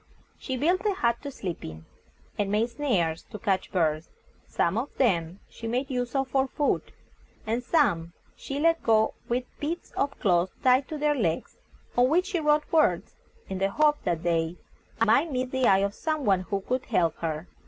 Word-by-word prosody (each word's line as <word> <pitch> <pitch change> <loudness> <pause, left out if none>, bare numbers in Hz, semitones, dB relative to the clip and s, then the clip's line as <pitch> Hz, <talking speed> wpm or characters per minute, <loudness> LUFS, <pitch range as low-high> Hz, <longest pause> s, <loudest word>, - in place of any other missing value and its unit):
She 260 -2 -3
built 350 +8 +1
a 405 - +1
hut 235 -7 +1
to 285 - -5
sleep 190 -10 -6
in, 80 0 -8 0.5
and 200 -1 -1
made 220 +3 +1
snares 185 - 0
to - - -7
catch 195 -4 -1
birds. 160 -3 0 0.4
Some 170 - 0
of 245 +6 -3
them 180 -7 +1
she 230 - -8
made 255 +4 -1
use 245 0 -2
of 270 -1 +1
for 270 +1 +2
food, 290 +2 -1 0.5
and 230 +3 -1
some 195 - +1 0.2
she 275 +1 -5
let 330 +2 +3
go 220 -1 +3 0.2
with 245 +2 0 0.2
bits 325 +4 -4
of 280 0 -2
cloth 180 -3 +2
tied 255 +1 +4
to 310 - -5
their 300 0 +2
legs, 175 - -2 0.4
on 245 +1 +4
which 355 +5 +3
she 355 - 0
wrote 300 -1 +3
words, 300 - +2 0.3
in 190 -1 -4
the 195 +1 +2
hope 295 +7 +2
that 170 -3 -1
they 165 0 0 0.5
might 285 +8 +3
meet 255 -1 -2
the 260 -1 +2
eye 195 0 +5
of 200 - -3
some 310 +1 -2
one 195 -2 +3
who 195 +1 -3
could 255 +5 -2
help 170 -8 +1
her. 160 0 -3
235 Hz, 190 wpm, -27 LUFS, 185-280 Hz, 0.5 s, eye